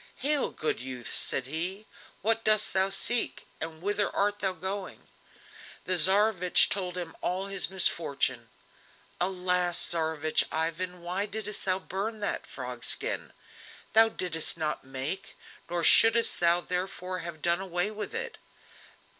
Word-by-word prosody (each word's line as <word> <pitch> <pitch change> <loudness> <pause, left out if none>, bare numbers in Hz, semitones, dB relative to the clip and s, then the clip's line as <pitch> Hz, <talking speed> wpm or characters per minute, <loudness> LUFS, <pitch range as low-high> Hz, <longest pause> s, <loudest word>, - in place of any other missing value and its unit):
"Hail, 290 0 0
good 155 - -2
youth!" 125 -1 -7
said 130 - +3
he, 175 +9 -4 0.4
"what 225 +2 +1
dost 215 -1 +4
thou 190 0 +2
seek, 230 +4 +2 0.2
and 160 +1 -6
whither 205 +1 0
art 205 +1 0
thou 190 -2 0
going?" 190 +3 -7 0.8
The 185 - +3
Tsarevich 190 +1 +5
told 185 -2 -2
him 170 -2 -6
all 185 +2 -2
his 195 -1 +1
misfortune. 140 -10 +1 0.7
"Alas! 180 -1 0
Tsarevich 160 -2 +1
Ivan, 170 +3 -3
why 185 +4 -3
didst 210 -1 -3
thou 185 -1 +1
burn 200 +4 -5
that 205 - -3
frog - - -8
skin? - - -1 0.6
Thou 225 0 +6
didst 170 -6 -1
not 155 -2 -3
make, 135 +9 -6 0.3
nor 175 -1 -2
shouldst 225 +6 +6
thou 170 0 +3
therefore 185 0 -4
have 165 -2 -9
done 170 +2 +2
away 180 +2 -2
with 215 - -7
it. 470 -1 -5
185 Hz, 140 wpm, -28 LUFS, 165-200 Hz, 0.8 s, Thou